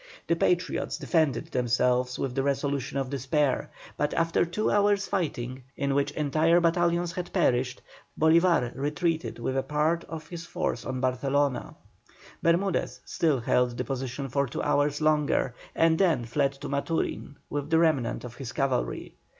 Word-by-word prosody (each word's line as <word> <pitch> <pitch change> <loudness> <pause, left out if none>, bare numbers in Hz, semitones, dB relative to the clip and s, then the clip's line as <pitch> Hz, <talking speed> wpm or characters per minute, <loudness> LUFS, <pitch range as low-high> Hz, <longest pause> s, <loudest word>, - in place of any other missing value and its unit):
The 170 - +2
Patriots 180 +2 0
defended 155 -8 0
themselves 125 0 +1
with 135 -2 -2
the 135 - 0
resolution 140 0 -1
of 135 -1 -2
despair, 140 +1 0 0.3
but 150 0 0
after 165 0 +2
two 175 +6 -1
hours 205 0 +3
fighting, 130 -9 -3 0.2
in 140 0 0
which 140 +1 +1
entire 155 +3 +3
battalions 170 0 +2
had 175 0 -5
perished, 125 +1 +1 0.4
Bolívar 160 -5 +4
retreated 155 +4 -1
with 125 +3 -2
a 135 - +2
part 155 +4 0
of 160 -1 -8
his 170 0 -7
force 175 -9 -3
on 130 -1 -3
Barcelona. 135 +1 0 0.7
Bermudez 175 +3 +1
still 150 -7 +1
held 120 +1 +1
the 125 - -1
position 135 +2 -4
for 140 +2 0
two - - -4
hours 145 +1 +1
longer, 150 -4 +2 0.2
and 165 0 +3
then 165 -11 +2
fled 140 +4 0
to 140 +1 -8
Maturin 140 +1 -2 0.2
with 145 0 -3
the 160 - +4
remnant 150 -8 +1
of 125 -1 -9
his 130 -2 -6
cavalry. 135 - -1
145 Hz, 155 wpm, -27 LUFS, 130-165 Hz, 0.7 s, Bolívar